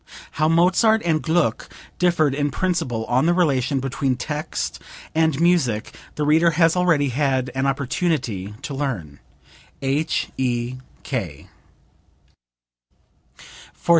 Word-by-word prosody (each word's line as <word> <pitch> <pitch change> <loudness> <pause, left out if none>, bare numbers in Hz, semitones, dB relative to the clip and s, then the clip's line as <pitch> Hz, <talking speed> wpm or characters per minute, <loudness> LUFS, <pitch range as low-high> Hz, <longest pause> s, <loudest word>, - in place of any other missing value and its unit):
[How 155 +1 +1
Mozart 185 +7 +3
and 160 -2 +1
Gluck 160 -8 0 0.3
differed 170 -5 +3
in 145 +1 0
principle 155 -9 -1
on 125 +7 +2
the 175 - +3
relation 140 -6 +1
between 135 0 -1
text 150 +5 -4 0.3
and 160 -3 +2
music 160 -11 +1 0.2
the 150 - -1
reader 160 +3 +4
has 165 -1 +4
already 165 -6 +2
had 130 -1 0
an 135 +1 0
opportunity 130 - -1
to 145 - -5
learn. 115 - -4 0.6
H.E.K. 130 - -3
145 Hz, 105 wpm, -22 LUFS, 130-165 Hz, 0.6 s, reader